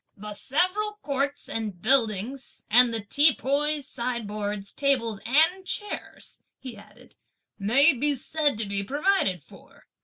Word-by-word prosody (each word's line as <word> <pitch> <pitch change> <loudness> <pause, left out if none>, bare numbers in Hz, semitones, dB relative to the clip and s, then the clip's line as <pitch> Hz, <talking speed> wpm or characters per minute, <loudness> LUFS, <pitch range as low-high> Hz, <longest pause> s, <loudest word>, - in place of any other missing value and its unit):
"The 210 +1 -8
several 370 - 0
courts 280 0 -2
and 215 -5 -4
buildings 245 +2 0
and 245 +1 +6
the 225 -1 -2
teapoys, 290 +3 +2
sideboards, 210 -4 -4
tables 245 -7 0
and 325 +9 +3
chairs," 415 +2 -6 0.2
he 255 -3 -8
added, 205 - -18 0.4
"may 270 +10 +4
be 285 +3 0
said 290 0 +1
to 220 - -2
be 200 0 -2
provided 280 - 0
for. - - -19
260 Hz, 125 wpm, -26 LUFS, 210-290 Hz, 0.4 s, and